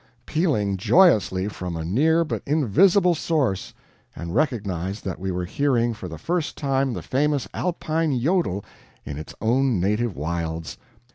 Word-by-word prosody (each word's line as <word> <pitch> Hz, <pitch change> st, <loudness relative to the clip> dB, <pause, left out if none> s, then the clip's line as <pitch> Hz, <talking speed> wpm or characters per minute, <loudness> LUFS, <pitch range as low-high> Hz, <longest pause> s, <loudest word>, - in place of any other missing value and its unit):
pealing 120 Hz, -, 0 dB
joyously 100 Hz, -, +4 dB
from 90 Hz, -4 st, -5 dB
a 80 Hz, -, -4 dB
near 160 Hz, -, +3 dB
but 160 Hz, -, -3 dB
invisible 170 Hz, -, +4 dB
source, 145 Hz, -, -1 dB, 0.4 s
and 85 Hz, 0 st, -6 dB
recognized 100 Hz, -, -1 dB
that 95 Hz, -, -4 dB
we 95 Hz, +1 st, -3 dB
were 90 Hz, 0 st, -2 dB
hearing 120 Hz, +2 st, +1 dB
for 100 Hz, -4 st, -8 dB
the 80 Hz, -2 st, -7 dB
first 170 Hz, -, -2 dB
time 135 Hz, -2 st, 0 dB
the -, -, -5 dB
famous 145 Hz, +1 st, 0 dB
Alpine 160 Hz, -5 st, -1 dB
JODEL 140 Hz, -, 0 dB, 0.4 s
in 70 Hz, 0 st, -5 dB
its 80 Hz, -, -9 dB
own 120 Hz, 0 st, +2 dB
native 105 Hz, +3 st, 0 dB
wilds. 80 Hz, +1 st, -4 dB
120 Hz, 145 wpm, -24 LUFS, 95-155 Hz, 0.4 s, joyously